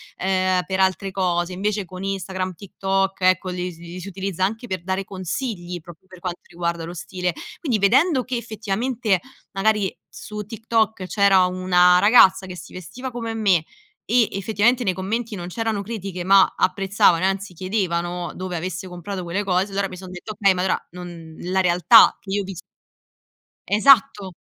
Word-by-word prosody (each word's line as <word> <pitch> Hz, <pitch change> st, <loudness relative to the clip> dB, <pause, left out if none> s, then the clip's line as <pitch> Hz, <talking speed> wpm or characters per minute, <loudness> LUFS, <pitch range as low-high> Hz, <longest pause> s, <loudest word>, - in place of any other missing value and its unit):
ehm, 185 Hz, -1 st, +1 dB
per 190 Hz, 0 st, -2 dB
altre 190 Hz, +1 st, +1 dB
cose, 180 Hz, -2 st, -1 dB
invece 205 Hz, +2 st, -1 dB
con 185 Hz, +2 st, -9 dB
Instagram, 190 Hz, -1 st, -3 dB
TikTok, 195 Hz, +1 st, -2 dB
ecco, 185 Hz, 0 st, +3 dB
li 180 Hz, 0 st, -3 dB
s -, -, -17 dB
li 175 Hz, +1 st, -9 dB
si 185 Hz, -, -8 dB
utilizza 190 Hz, -1 st, -2 dB
anche 225 Hz, +4 st, -4 dB
per 185 Hz, -5 st, -4 dB
dare 190 Hz, +1 st, -2 dB
consigli 185 Hz, -1 st, -5 dB
proprio 175 Hz, +2 st, -15 dB
per 185 Hz, -1 st, -14 dB
quanto 175 Hz, -1 st, -5 dB
riguarda 170 Hz, -1 st, -3 dB
lo 170 Hz, -, -7 dB
stile. 180 Hz, 0 st, -3 dB, 0.3 s
Quindi 255 Hz, -10 st, 0 dB
vedendo 255 Hz, -, +3 dB
che, 255 Hz, -1 st, -3 dB
effettivamente, 220 Hz, -1 st, -1 dB, 0.3 s
magari 205 Hz, 0 st, +1 dB
su 210 Hz, 0 st, -8 dB
TikTok 220 Hz, -2 st, -1 dB
c'era 195 Hz, -2 st, +4 dB
una 180 Hz, -1 st, +4 dB
ragazza 195 Hz, -3 st, +6 dB
che 185 Hz, -, -8 dB
si -, -, -11 dB
vestiva 250 Hz, +9 st, -7 dB
come 230 Hz, -2 st, -5 dB
me 195 Hz, -7 st, +2 dB, 0.4 s
e, 235 Hz, -1 st, +3 dB
effettivamente, 220 Hz, +5 st, +1 dB
nei 190 Hz, -, +1 dB
commenti 215 Hz, +5 st, -3 dB
non 175 Hz, -1 st, -6 dB
c'erano 220 Hz, +1 st, -2 dB
critiche 195 Hz, -4 st, -5 dB
ma 195 Hz, 0 st, +5 dB
apprezzavano 185 Hz, -2 st, +2 dB
e -, -, +4 dB
anzi 195 Hz, 0 st, -3 dB
chiedevano 175 Hz, -2 st, -2 dB
dove 185 Hz, -2 st, -4 dB
avesse 185 Hz, +2 st, -5 dB
comprato 180 Hz, +1 st, -6 dB
quelle 175 Hz, +4 st, -2 dB
cose, 190 Hz, +1 st, +1 dB
allora 195 Hz, 0 st, -1 dB
mi 185 Hz, -, -9 dB
son 185 Hz, 0 st, -10 dB
detta: 185 Hz, +4 st, -7 dB
"Okay, 200 Hz, -2 st, +3 dB
ma 180 Hz, -, -2 dB
allora, 190 Hz, -, -1 dB
non 170 Hz, -2 st, -10 dB
la 185 Hz, +2 st, 0 dB
realtà 180 Hz, +5 st, +6 dB
che 195 Hz, -, -10 dB
io 205 Hz, -, +1 dB
ho -, -, -5 dB
vis" 190 Hz, -3 st, -7 dB, 1.1 s
Esatto! 215 Hz, -4 st, +4 dB
190 Hz, 175 wpm, -22 LUFS, 180-210 Hz, 1.1 s, ragazza